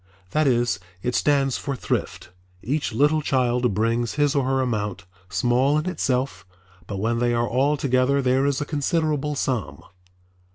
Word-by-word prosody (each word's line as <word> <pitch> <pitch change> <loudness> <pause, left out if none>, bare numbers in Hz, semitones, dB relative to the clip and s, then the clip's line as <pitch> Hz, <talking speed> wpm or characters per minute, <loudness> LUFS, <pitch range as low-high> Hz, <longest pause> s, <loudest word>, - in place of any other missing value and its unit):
That 155 -1 +2
is, 120 -6 +1 0.2
it 125 - -1
stands 140 -2 +2
for 140 - -3
Thrift. 90 - -3 0.3
Each 145 +3 -1
little 150 +6 +2
child 125 -5 +1
brings 115 +2 0
his 145 -1 +2
or 140 -3 +1
her 135 0 +1
amount, 105 -7 -2 0.2
small 120 +10 +2
in 155 - -1
itself, 130 - -1 0.4
but 100 - -4
when 115 +4 0
they 120 0 +1
are 120 0 +1
all 135 +5 +1
together 130 +1 +2
there 130 +1 +2
is 140 -2 0
a 145 - -2
considerable 150 0 -1
sum. 100 - -2
130 Hz, 160 wpm, -23 LUFS, 120-145 Hz, 0.4 s, That